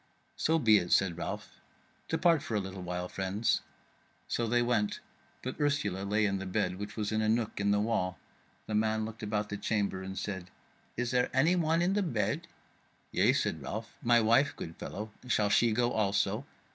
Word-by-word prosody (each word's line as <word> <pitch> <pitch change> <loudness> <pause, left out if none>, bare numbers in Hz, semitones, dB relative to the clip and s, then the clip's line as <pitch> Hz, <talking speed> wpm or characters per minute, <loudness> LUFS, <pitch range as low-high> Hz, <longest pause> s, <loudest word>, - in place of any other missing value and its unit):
"So 160 +1 +2
be 110 -8 +5
it," 85 - -5
said 95 -3 +3
Ralph; 85 - -6 0.5
"depart 165 -1 +3
for 115 - -4
a - - +3
little 95 -1 -6
while, 90 0 -3
friends." 95 +4 0 0.7
So 115 - -1
they 120 +1 +3
went 115 -4 +1 0.4
but 130 - -5
Ursula 105 -10 0
lay 105 +2 +2
in 100 -1 0
the 95 - -5
bed, 90 0 0
which 105 - -6
was 105 -1 -1
in 110 0 +1
a 110 - +1
nook 110 -2 0
in 100 0 +1
the 105 0 +3
wall; 105 -4 0 0.5
the 110 - -5
man 110 0 +1
looked 110 0 -8
about 105 0 -2
the 105 - -3
chamber 100 -2 -1
and 95 0 -6
said: 95 -2 -4 0.5
"Is 125 0 -1
there 125 -1 +2
any 155 +7 +4
one 165 -1 +2
in 185 +2 +2
the 205 - +2
bed?" 145 - -1 0.6
"Yea," - - +4
said - - 0
Ralph, 110 +1 -6
"my 120 0 +5
wife, 115 +5 +3
good 80 - -7
fellow; 105 +2 -6 0.2
shall 105 -4 +2
she 115 +4 +4
go 120 +2 +2
also?" 100 +4 0
110 Hz, 195 wpm, -31 LUFS, 100-120 Hz, 0.7 s, be